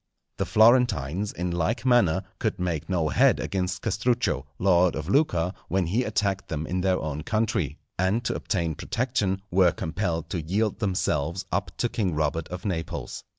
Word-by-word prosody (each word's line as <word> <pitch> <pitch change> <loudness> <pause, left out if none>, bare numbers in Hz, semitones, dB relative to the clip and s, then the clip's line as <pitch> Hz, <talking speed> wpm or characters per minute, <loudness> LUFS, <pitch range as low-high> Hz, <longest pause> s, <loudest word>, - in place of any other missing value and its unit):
The - - -1
Florentines, 105 - +3
in 90 0 -3
like 105 +8 -1
manner, 100 -8 +4 0.2
could - - -1
make 85 -4 -2
no 85 -4 +1
head - - +4
against 95 -1 -2
Castruccio, 115 - 0
lord 90 -2 +3
of 75 0 -4
Lucca, 90 - +2
when 95 -1 +1
he 105 +10 +1
attacked 100 -3 -1
them 80 0 -3
in 90 +2 -2
their 95 0 +2
own 75 -1 -4
country; 110 - -1 0.2
and 95 +6 +1
to - - -1
obtain 85 -5 -1
protection, 105 - -1
were 90 -1 +5
compelled 85 -1 -2
to 85 - -1
yield 100 +6 -1
themselves 90 -3 -1
up - - -2
to - - +1
King 95 -7 -1
Robert 80 +2 -1
of 90 +2 -7
Naples. 85 -5 -4
95 Hz, 165 wpm, -26 LUFS, 85-105 Hz, 0.2 s, were